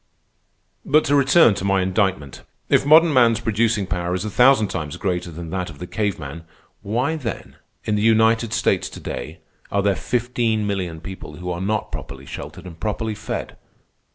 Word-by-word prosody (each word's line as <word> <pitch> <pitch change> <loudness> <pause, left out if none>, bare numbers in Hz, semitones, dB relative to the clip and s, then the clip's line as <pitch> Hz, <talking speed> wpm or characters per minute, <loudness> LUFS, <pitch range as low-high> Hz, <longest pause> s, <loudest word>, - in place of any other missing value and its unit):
"But 155 +2 +3
to 145 - +2
return 140 -2 +5
to 95 - -5
my 95 -1 +2
indictment. 95 -7 -1 0.3
If - - +3
modern 160 +1 +7
man's 115 -4 +4
producing 110 -2 +1
power 85 0 -2
is 95 - -3
a 105 - -4
thousand 125 -2 +5
times 75 -5 -4
greater 90 -3 -2
than 85 0 -8
that 90 -2 -3
of - - -11
the 90 - -7
cave 105 0 -2
man, 80 +2 -8 0.4
why 125 +10 -1
then, 130 -8 -6 0.3
in 105 - -1
the 105 - +1
United 115 +1 +3
States - - +1
to - - -10
day, - - -6 0.3
are 100 0 +1
there 100 -1 +2
fifteen 120 -2 -1
million 90 -5 -3
people 95 +1 -9
who 90 0 -5
are 85 +1 -4
not 105 +2 -1
properly 70 0 -8
sheltered - - -8
and 85 -3 -10
properly 110 +1 -2
fed? 105 - -5
105 Hz, 180 wpm, -22 LUFS, 90-115 Hz, 0.4 s, modern